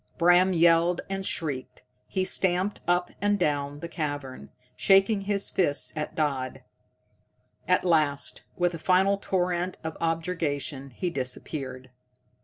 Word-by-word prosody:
Bram 175 +2 +5
yelled 170 +1 +4
and 195 0 -2
shrieked, 150 -10 -4 0.2
he 190 - -1
stamped 185 +1 +1
up 175 0 +1
and 205 0 +2
down 145 -4 -1
the 170 - -4
cavern, 145 -5 -5 0.3
shaking 195 +2 +4
his 200 0 -1
fists 145 -6 +1
at 150 -1 -4
Dodd. 135 -4 -2 1.0
At - - +2
last, 155 -5 +1 0.2
with 175 0 +1
a 165 - -6
final 190 +4 +3
torrent 180 -1 -1
of 160 0 -4
objurgation, 160 -4 -2
he 175 +8 -3
disappeared. 130 -1 -4
170 Hz, 125 wpm, -27 LUFS, 145-185 Hz, 1.0 s, Bram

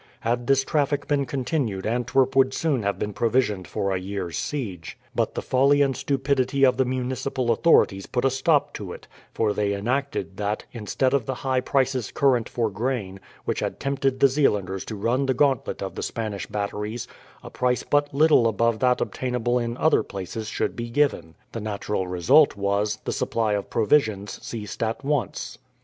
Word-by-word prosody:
Had 120 +1 -1
this 135 -1 +4
traffic 145 0 0
been 140 -2 +1
continued 125 -7 -2
Antwerp 125 +3 +1
would 135 0 +4
soon 150 -7 0
have 100 -1 -1
been 105 0 -3
provisioned 110 -5 0
for 100 - -2
a 95 - 0
year's 95 -3 -4
siege; 100 - -4 0.2
but - - -1
the - - -3
folly 140 +2 +4
and 135 -2 0
stupidity 135 -1 +1
of 130 -1 +3
the 130 - +3
municipal 130 0 -1
authorities 110 - +3
put 125 0 -1
a 135 - +3
stop 140 +3 +2
to 95 -4 -6
it, - - -12 0.2
for 110 -2 0
they 100 -1 0
enacted 115 -4 -2
that, 105 +1 -2
instead 125 +3 -1
of 135 -6 +1
the 135 - -2
high 130 -1 +2
prices 130 -3 0
current 130 -5 +2
for 115 -2 0
grain, 105 -3 -3 0.3
which - - -1
had - - -3
tempted 135 -1 -1
the 140 - +7
Zeelanders 105 -9 0
to 110 - -5
run 120 +7 0
the 130 - +1
gauntlet 135 -6 +1
of 95 - -5
the - - -5
Spanish 110 -3 -4
batteries, 105 +2 -4 0.4
a - - -9
price 125 0 0
but 145 0 +1
little 145 -4 +5
above 115 +1 +1
that 125 0 +2
obtainable 125 -1 -1
in 120 0 -3
other 160 - +3
places 100 +3 -6
should - - -2
be 120 0 -5
given. 115 - 0 0.2
The 115 - -5
natural 105 -2 -2
result 110 - +4
was, 100 +1 0
the - - -1
supply 110 -2 0
of 100 -1 -2
provisions 110 -4 +1
ceased 105 -4 -6
at 115 +4 -2
once. 140 -8 -2
120 Hz, 180 wpm, -24 LUFS, 105-135 Hz, 0.4 s, the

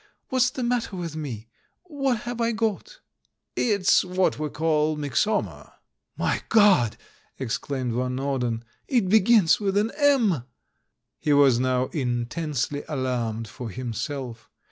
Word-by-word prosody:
What's 255 -1 +3
the 255 0 -5
matter 240 -4 -1
with 170 -4 -5
me, 125 -8 -6 0.4
what 275 -9 -1
have 240 -1 -4
I 230 0 +1
got?" 225 - -3 0.5
"It's 200 -5 +3
what 185 -3 0
we 155 -1 -2
call 155 0 +1
'Myxoma.' 150 - -1 0.2
" - - -50
"My - - 0
God!" 200 - +4 0.4
exclaimed 130 0 -3
Van 125 +1 -1
Norden. 125 -4 -2 0.2
"It 235 -9 +1
be 220 +3 +6
gins 205 -4 +4
with 200 -1 0
an 215 +2 +1
M 245 - +3 0.4
!" - - -55
He 150 - +1
was 140 -4 +5
now 130 0 +1
intensely 140 +2 -2
alarmed 120 -5 -2
for 120 +1 -7
himself. 125 +1 -5
155 Hz, 140 wpm, -25 LUFS, -, 0.5 s, be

